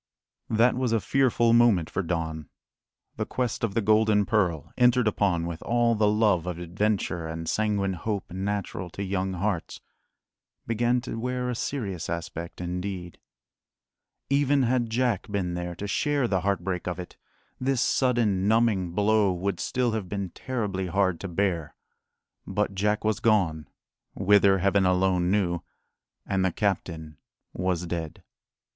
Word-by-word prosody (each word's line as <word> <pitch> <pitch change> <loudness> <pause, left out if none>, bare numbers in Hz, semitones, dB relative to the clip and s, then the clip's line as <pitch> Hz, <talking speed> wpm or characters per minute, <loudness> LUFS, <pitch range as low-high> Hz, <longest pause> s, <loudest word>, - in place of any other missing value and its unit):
That 115 +3 +4
was 125 -2 0
a 115 - +3
fearful 120 -1 +2
moment 115 -9 +4
for 95 - -2
Don. 80 -4 -3 0.7
The - - -1
quest 125 -3 -2
of 105 -3 -1
the 115 - +2
golden 110 -1 +4
pearl, 90 -8 0
entered 125 -1 +4
upon 95 -5 +1
with 85 -1 -5
all 120 0 +2
the 105 -1 +2
love 105 -5 +2
of 90 -2 -3
adventure 90 -1 -1
and 80 0 -5
sanguine 100 -1 0
hope 100 +1 -4
natural 95 -1 -3
to 100 - -2
young 95 -1 -1
hearts, 95 -1 -2 0.9
began 120 +2 +1
to 115 - -5
wear 125 +1 -2
a - - -3
serious 100 - -3
aspect 85 0 -5
indeed. 90 0 -5 1.1
Even 140 0 +3
had 120 -1 +1
Jack 115 -3 0
been 95 -4 -1
there 90 0 -4
to 100 - -6
share 145 +4 +1
the 95 -4 0
heartbreak 95 -1 -1
of 90 -1 -2
it, 90 -1 -8 0.4
this 130 0 0
sudden, 115 -7 +2
numbing 105 -6 +2
blow 105 0 +3
would 90 0 -2
still 125 -2 0
have 110 -5 -3
been 100 -3 -3
terribly 105 -7 -3
hard 95 -1 +1
to 100 - -5
bear. 85 -3 -1 0.7
But 105 -1 -1
Jack 105 +2 0
was 110 -2 +1
gone 90 -9 +1 0.5
whither, 100 0 +4
Heaven 100 +1 +2
alone 90 -1 +2
knew 90 -4 +1 0.6
and 95 -1 0
the 95 - +2
captain 80 -6 -2 0.4
was 90 -1 -1
dead. 85 -2 -5
100 Hz, 150 wpm, -26 LUFS, 90-115 Hz, 1.1 s, That